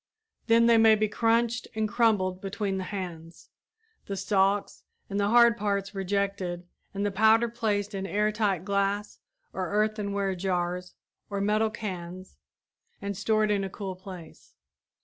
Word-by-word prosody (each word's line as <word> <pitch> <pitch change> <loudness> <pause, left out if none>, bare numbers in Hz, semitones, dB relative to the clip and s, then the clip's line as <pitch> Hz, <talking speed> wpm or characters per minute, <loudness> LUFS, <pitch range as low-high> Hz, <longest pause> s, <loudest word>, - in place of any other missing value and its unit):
Then 230 0 +5
they 230 -1 +5
may 225 -1 +7
be 215 0 +1
crunched 230 +2 +1
and 220 0 0
crumbled 205 -5 +1
between 195 0 -2
the 185 - -4
hands, 170 -4 -7 0.6
the 195 - -4
stalks 195 +1 +1 0.3
and 200 - -1
the 200 0 +1
hard 235 0 +6
parts 200 -2 -1
rejected 195 -2 -2 0.3
and 200 +1 -2
the 205 - 0
powder 220 +4 +4
placed 215 -3 -2
in 195 0 -3
air 210 +3 +1
tight 200 -5 0
glass 200 +1 -1 0.3
or 185 -1 -3
earthenware 205 -2 0
jars 180 -1 -2 0.3
or 200 -1 -3
metal 210 +2 +2
cans, 185 -4 -7 0.6
and 200 0 -4
stored 215 +2 +1
in 200 -1 +1
a 195 - -3
cool 190 -1 -6
place. 180 -3 -12
200 Hz, 150 wpm, -27 LUFS, 190-215 Hz, 0.6 s, may